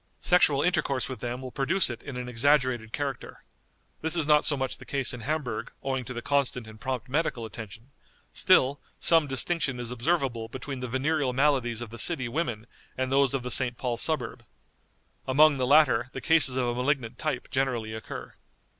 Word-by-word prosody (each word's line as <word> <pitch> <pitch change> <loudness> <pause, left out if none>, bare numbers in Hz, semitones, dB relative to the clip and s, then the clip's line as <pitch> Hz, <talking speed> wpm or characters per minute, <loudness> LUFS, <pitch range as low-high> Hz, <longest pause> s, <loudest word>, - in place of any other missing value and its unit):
Sexual 150 -6 +3
intercourse 140 -7 0
with 130 -4 -7
them 125 +2 -4
will 130 - -7
produce 170 +9 +1
it 120 -2 -6
in 140 -3 -8
an 125 0 -5
exaggerated 125 -2 +1
character. 140 +1 -5 0.6
This 160 +2 0
is 165 -3 +1
not 150 0 +4
so 145 -4 +1
much 130 -1 -3
the - - -11
case 135 -3 -2
in 125 - -7
Hamburg, 125 -3 -3
owing 130 -2 -2
to 125 - -6
the 120 - -5
constant 140 -4 0
and 110 0 -13
prompt 130 -1 -3
medical 130 -4 -1
attention; 110 +3 -10 0.4
still, 140 +2 +3 0.2
some 165 -3 +5
distinction 135 -1 -1
is 120 -1 -4
observable 125 -3 -1
between 130 +2 -7
the 125 - -4
venereal 135 +2 0
maladies 130 -4 +1
of 115 -2 -7
the 115 - -8
city 135 -2 +3
women 120 -5 -3 0.3
and 130 0 -2
those 135 -1 +3
of 130 - -3
the 125 - -3
St. 120 0 +2
Paul 125 -2 -2
Suburb. 120 -3 -2 0.8
Among 145 +2 +5
the 130 -1 0
latter 130 -4 +4
the - - -5
cases 145 -4 +5
of 130 -1 +1
a 120 - -1
malignant 125 -1 -1
type 150 -6 -3
generally 125 -5 -1
occur." 110 0 -8
130 Hz, 190 wpm, -27 LUFS, 120-145 Hz, 0.8 s, some